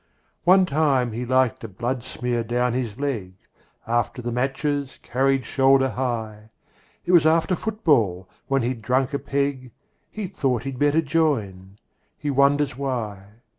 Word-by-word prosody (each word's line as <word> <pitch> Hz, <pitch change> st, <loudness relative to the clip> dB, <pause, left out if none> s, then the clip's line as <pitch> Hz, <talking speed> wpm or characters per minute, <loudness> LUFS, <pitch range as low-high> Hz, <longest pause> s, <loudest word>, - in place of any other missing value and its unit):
One 185 Hz, +1 st, +6 dB
time 140 Hz, -6 st, +1 dB
he 120 Hz, +3 st, -4 dB
liked 130 Hz, -2 st, +2 dB
a -, -, -4 dB
bloodsmear 120 Hz, +2 st, -3 dB
down 120 Hz, +1 st, 0 dB
his 120 Hz, -4 st, -3 dB
leg, 115 Hz, -10 st, -3 dB, 0.5 s
After 120 Hz, +1 st, -1 dB
the 120 Hz, 0 st, -4 dB
matches 135 Hz, +2 st, -2 dB
carried 135 Hz, 0 st, +1 dB
shoulder 135 Hz, +1 st, +3 dB
high. 110 Hz, -5 st, -4 dB, 0.6 s
It -, -, 0 dB
was 165 Hz, -4 st, +6 dB
after 165 Hz, +3 st, +3 dB
football, 140 Hz, -, +1 dB, 0.2 s
when 135 Hz, -2 st, +1 dB
he'd 120 Hz, -1 st, -2 dB
drunk 130 Hz, +4 st, 0 dB
a 140 Hz, -, 0 dB
peg, 140 Hz, -2 st, -2 dB, 0.4 s
He 215 Hz, -2 st, -5 dB
thought 130 Hz, -9 st, -1 dB
he'd 135 Hz, -1 st, -5 dB
better 145 Hz, +2 st, +3 dB
join. 110 Hz, -, -1 dB, 0.4 s
He 145 Hz, -1 st, -2 dB
wonders 140 Hz, 0 st, +2 dB
why 115 Hz, -8 st, -4 dB
130 Hz, 140 wpm, -23 LUFS, 120-145 Hz, 0.6 s, One